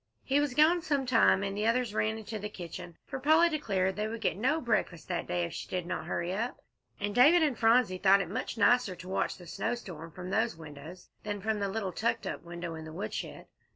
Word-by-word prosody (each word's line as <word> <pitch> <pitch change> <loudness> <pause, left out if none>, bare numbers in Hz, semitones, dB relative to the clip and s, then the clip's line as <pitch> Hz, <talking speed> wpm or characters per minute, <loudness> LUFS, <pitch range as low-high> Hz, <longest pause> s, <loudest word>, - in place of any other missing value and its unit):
He 275 +2 +2
was 290 -3 0
gone 325 +4 +5
some 285 -4 0
time, 230 -5 +4
and 195 0 -2
the 210 +2 0
others 235 -2 +1
ran 220 +1 0
into 220 0 -6
the 210 +1 -5
kitchen, 175 -2 -8
for 270 - -5
Polly 315 +5 +5
declared 195 - 0
they 210 +1 -1
would 225 +1 -5
get - - +1
no 260 +10 +1
breakfast 215 - -1
that 175 -2 -2
day 90 0 0
if 85 - -4
she - - -6
did 180 -2 -2
not - - -4
hurry 175 +2 -2
up, 230 +5 -2 0.4
and 205 0 -2
David 300 +9 +6
and 290 -5 +2
Phronsie 225 -4 +3
thought 195 +1 +6
it 195 - -2
much 200 +5 -4
nicer 245 -5 +3
to 180 - -11
watch 190 - -1
the 180 - -12
snowstorm 170 -4 -4
from 180 +2 -7
those 160 - +1
windows 160 +3 -11
than 205 -1 -4
from 215 +1 -1
the 200 -1 -1
little 195 -2 -2
tucked 230 +5 -1
up - - -4
window 170 0 -6
in 160 0 -7
the 160 - -8
woodshed. 190 +5 -5
205 Hz, 230 wpm, -30 LUFS, 180-245 Hz, 0.4 s, David